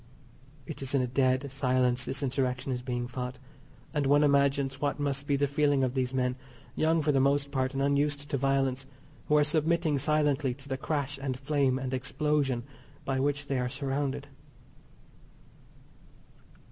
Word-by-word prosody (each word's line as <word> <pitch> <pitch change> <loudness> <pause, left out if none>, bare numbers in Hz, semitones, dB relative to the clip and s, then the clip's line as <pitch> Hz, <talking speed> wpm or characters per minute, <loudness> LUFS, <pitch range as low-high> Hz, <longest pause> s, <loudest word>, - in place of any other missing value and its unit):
It 150 - -7
is 135 +1 -1
in 130 - +3
a - - -1
dead 130 +1 +1
silence 125 -1 +1
this 140 +3 -2
Insurrection 130 0 -1
is 125 -1 -2
being 120 -1 -3
fought, 125 +1 -5 0.6
and 145 -3 +1
one 145 +2 +5
imagines 140 -1 +2
what 145 0 -1
must 140 -1 -1
be 140 - +2
the 140 +1 +2
feeling 145 -1 +2
of 125 -1 0
these 130 -2 -1
men, 125 -1 0 0.4
young 160 0 +2
for 150 - +3
the 135 - +3
most 140 +1 +2
part, 130 -1 -1
and 135 - 0
unused 145 +1 +1
to - - +1
violence, 135 -1 0 0.4
who 150 - +4
are 150 - +5
submitting 155 0 +1
silently 145 -3 +1
to 140 +1 -11
the 135 - -2
crash 145 0 -2
and 130 -2 -2
flame 140 -2 +1
and 130 -1 -4
explosion 135 -1 0 0.4
by 135 -1 0
which 145 +1 0
they 135 -2 -1
are 125 0 -1
surrounded. 140 +1 -2
135 Hz, 170 wpm, -29 LUFS, 130-145 Hz, 0.6 s, one